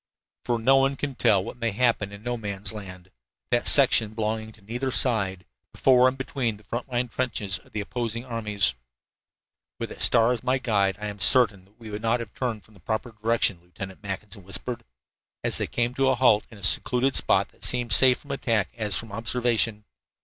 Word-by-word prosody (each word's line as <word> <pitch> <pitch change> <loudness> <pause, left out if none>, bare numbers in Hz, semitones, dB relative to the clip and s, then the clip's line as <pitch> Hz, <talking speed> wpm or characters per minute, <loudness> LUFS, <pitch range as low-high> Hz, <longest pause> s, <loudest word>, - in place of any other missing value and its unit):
For 120 - 0
no 130 +4 +4
one 135 +1 +2
can 140 0 -4
tell 100 -6 +2
what 120 - -8
may 115 -1 0
happen 110 -2 +1
in 100 +1 -11
No 120 0 -2
Man's 100 -3 -3
Land 95 -3 -10 0.4
that 120 0 +2
section 115 -6 +4
belonging 110 0 -2
to 110 - -20
neither 120 +6 -3
side, 100 -9 +1 0.3
before 130 -1 +4
and 130 +1 -1
between 130 -5 -2
the 105 - -20
front 120 +5 -5
line 125 0 -1
trenches 110 -6 -2
of - - -23
the 105 - -3
opposing 115 +2 -4
armies. 105 - -1 1.1
"With - - -4
that - - -9
star 115 +2 +4
as 120 - -5
my 130 +1 +1
guide, 100 -7 0
I 105 - -5
am 105 -1 -6
certain 100 -3 +4
that 105 +4 -30
we 115 -2 -10
have 105 +1 -5
not 115 +2 +1
turned 115 -5 -3
from 110 - -22
the 100 - -19
proper 110 +7 -3
direction," 110 -4 0
Lieutenant 95 +2 -9
Mackinson 100 0 -7
whispered, 115 +6 -3 0.6
as - - +1
they - - -1
came 120 +1 -1
to 135 0 +2
a 130 - +3
halt 120 -4 +4
in 110 - -13
a 100 - -15
secluded 130 +7 +2
spot - - +2
that - - -19
seemed 120 -1 +1
as - - +9
safe 130 -2 +5
from 145 - -10
attack 115 -7 0
as 105 -5 0
from 115 -3 -5
observation. 115 -1 0
115 Hz, 205 wpm, -25 LUFS, 105-125 Hz, 1.1 s, as